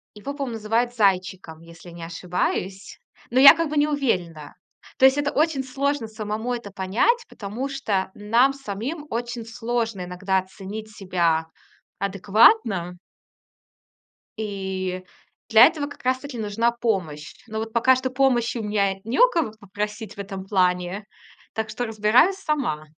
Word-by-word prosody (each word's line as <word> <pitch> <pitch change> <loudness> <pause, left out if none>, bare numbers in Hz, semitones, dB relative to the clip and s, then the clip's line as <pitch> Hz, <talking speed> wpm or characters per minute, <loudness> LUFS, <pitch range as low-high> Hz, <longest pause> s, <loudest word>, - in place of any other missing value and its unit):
его 270 +7 -6
по-моему, 275 -4 -4
называют 230 +3 0
зайчиком, 185 -5 0
если 170 +1 -14
не 170 0 -10
ошибаюсь. 180 +3 -3 0.3
Но 255 - +3
я 275 +1 +10
как 330 -2 -1
бы 305 - -3
не 290 +1 +4
уверена. 180 - -2 0.4
То 265 - +5
есть 265 +1 +6
это 290 0 0
очень 300 -3 +1
сложно 275 -1 -2
самому 220 +2 -4
это 235 -5 -6
понять, 210 - +1
потому 215 +6 -5
что 205 -9 -2
нам 235 +6 +2
самим 275 +5 -6
очень 240 0 -4
сложно 230 -3 -3
иногда 190 +2 0
оценить 200 +3 -8
себя 170 -5 0 0.5
адекватно. 200 - +3 1.4
И 190 -3 -4 0.5
для 225 +2 +9
этого 305 -4 -3
как 290 - -13
раз 255 0 +1
таки 280 -3 -8
нужна 220 +2 0
помощь. 185 -11 -3
Но 220 0 -4
вот 220 0 -5
пока 255 +2 +4
что 260 0 -2
помощи 250 -3 +1
у 225 - -4
меня 200 -2 +1
не 230 - -2
у - - +7
кого 325 - -1
попросить 210 +1 -5
в - - -14
этом 195 -1 -6
плане, 180 0 0 0.5
так 220 -1 -3
что 245 - -3
разбираюсь 225 - +3
сама. 270 - -2
220 Hz, 150 wpm, -23 LUFS, 190-255 Hz, 1.4 s, я